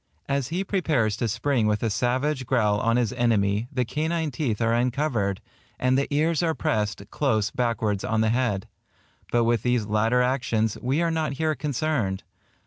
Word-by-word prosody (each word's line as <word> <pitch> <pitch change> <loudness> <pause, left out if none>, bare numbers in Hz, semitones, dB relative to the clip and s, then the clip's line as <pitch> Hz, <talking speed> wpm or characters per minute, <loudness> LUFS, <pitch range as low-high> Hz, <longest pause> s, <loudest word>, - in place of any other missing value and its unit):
As 140 -2 0
he 175 +5 -2
prepares 155 - 0
to 120 - -1
spring 120 +1 0
with 105 +1 0
a 115 - +1
savage 130 +4 0
growl 105 -5 +2
on 115 +2 +2
his 125 -1 0
enemy, 110 -3 +1
the 125 -3 0
canine 155 +5 -1
teeth 120 -5 -2
are 115 0 +2
uncovered, 120 -5 0 0.4
and 130 0 +2
the 140 +2 0
ears 155 +2 +2
are 165 -2 +1
pressed 105 -4 -1
close 110 -8 +1
backwards 115 -6 -1
on 110 -3 0
the 110 - +2
head; 115 -5 0 0.6
but 120 -1 +3
with 115 0 +2
these 125 -3 +1
latter 110 +4 +2
actions, 120 -4 0
we 135 +7 +1
are 165 - +1
not 160 -3 -1
here 155 +2 0
concerned. 145 -9 -1
125 Hz, 175 wpm, -25 LUFS, 110-145 Hz, 0.6 s, but